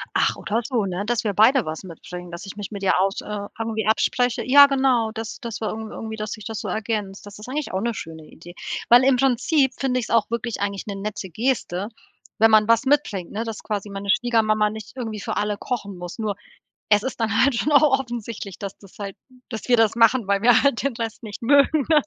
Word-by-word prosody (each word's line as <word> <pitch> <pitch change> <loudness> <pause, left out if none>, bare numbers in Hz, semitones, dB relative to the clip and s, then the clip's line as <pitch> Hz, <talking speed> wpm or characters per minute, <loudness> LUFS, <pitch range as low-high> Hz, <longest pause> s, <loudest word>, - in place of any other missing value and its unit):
Ach, - - +2
oder 220 +3 -1
so, 235 -4 -1
ne? 185 +1 -3
Dass 240 +1 0
wir 210 -2 -1
beide 230 +5 +4
was 155 +3 -5
mitbringen, 180 0 -9
dass 170 +3 -8
ich 195 - -8
mich 205 0 -7
mit 200 -1 -6
ihr 190 - +3
aus 195 +1 0
äh, 205 -1 -5
irgendwie 220 -2 -2
abspreche. 245 +2 +1
Ja 285 +3 +9
genau, 260 -5 +2
das 225 -1 -6
das 235 -3 -5
wir 215 - -1
irgend 220 0 -6
irgendwie 220 0 -6
dass 215 -1 -5
sich 215 - -7
das 225 -2 -4
so - - -5
ergänzt. 210 -3 -3
Das 205 0 -11
ist 210 - -10
eigentlich 290 +2 -3
auch 190 - -1
'ne 235 +1 -1
schöne 160 -5 -8
Idee, 175 +3 -14 0.3
weil 245 +2 +8
im 265 -1 +4
Prinzip 270 +2 +2
finde 255 -2 0
ich's 235 - -5
auch 230 -2 +2
wirklich 235 -1 -3
eigentlich 200 -1 -2
'ne 200 - -4
nette 195 -1 -5
Geste, 210 -2 -1 0.5
wenn 225 +1 +6
man 215 -1 +5
was 230 +3 +3
mitbringt, 260 -11 0
ne? 220 +2 -3
Dass 225 -2 -6
quasi 210 -1 -4
meine 200 0 -6
Schwiegermama 215 -1 +2
nicht 220 +3 -9
irgendwie 225 -5 -5
für - - -4
alle 210 0 -1
kochen 200 -5 -4
muss. 175 +5 -8
Nur 210 -2 -2 0.5
es 210 0 +4
ist 260 -1 -4
dann 220 -1 +2
halt 275 -2 +3
schon 300 - 0
auch 285 -2 +5
offensichtlich, 230 -6 -6
dass 200 -1 -6
das 195 -2 -18
halt 200 -2 -5 0.3
dass 225 -4 -6
wir 245 - +5
das 225 -1 +3
machen, 230 -1 +4
weil 200 0 +1
wir 240 0 +5
halt 280 -4 +2
den 275 -3 -1
Rest 230 0 -5
nicht 215 0 -8
mögen, 280 +3 +4
ne? 305 -2 +5
220 Hz, 235 wpm, -23 LUFS, 200-245 Hz, 0.5 s, Ja